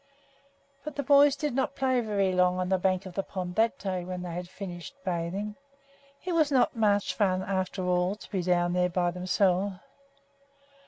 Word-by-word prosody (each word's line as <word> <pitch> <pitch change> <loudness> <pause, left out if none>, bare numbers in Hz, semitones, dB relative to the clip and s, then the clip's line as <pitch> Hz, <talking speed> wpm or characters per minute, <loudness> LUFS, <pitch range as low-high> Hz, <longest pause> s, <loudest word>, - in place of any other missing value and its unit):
But 305 -2 -6
the 285 - -2
boys 285 +1 +6
did 295 -3 -2
not 265 +2 -1
play 260 -2 +1
very 200 -4 0
long 180 0 +3
on 185 0 -1
the 190 -1 +2
bank 185 0 +1
of 185 - -8
the 195 - -1
pond 185 -2 -5
that 225 +1 +2
day 185 -3 -3
when 180 0 -5
they 175 - -5
had 175 +1 -5
finished 185 +7 -8
bathing. 185 +4 -3 0.7
It 365 - -1
was 310 -3 +3
not 260 -2 +3
much 205 -3 +2
fun, 185 -3 +1
after 185 -1 -2
all, 180 +2 +1
to 210 - -14
be 190 -3 0
down 175 0 +1
there 180 0 +2
by 175 0 0
themselves. 185 +2 +1
190 Hz, 190 wpm, -28 LUFS, 180-220 Hz, 0.7 s, boys